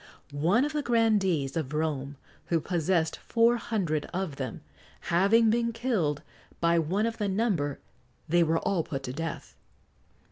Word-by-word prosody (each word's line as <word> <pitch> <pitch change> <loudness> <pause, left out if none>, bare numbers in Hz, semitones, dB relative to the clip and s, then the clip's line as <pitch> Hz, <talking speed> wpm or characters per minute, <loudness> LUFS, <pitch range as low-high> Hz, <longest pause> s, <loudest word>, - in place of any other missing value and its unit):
One 175 - +2
of 295 - -3
the 300 - 0
grandees 205 - +1
of 150 -3 -3
Rome, 145 -3 -2 0.3
who 165 - +2
possessed 165 -1 0
four 235 +1 +2
hundred 175 -11 -1
of 175 -6 -3
them, 130 -2 -5 0.5
having 215 +6 +5
been 235 0 +1
killed 195 - -1 0.4
by 170 0 +3
one 185 +7 0
of 230 0 -3
the 205 - 0
number, 190 - 0 0.5
they 175 +2 +3
were 165 0 +2
all 180 +1 0
put 135 -3 -5
to 125 - -5
death. 165 +3 -5
175 Hz, 150 wpm, -28 LUFS, 155-225 Hz, 0.5 s, having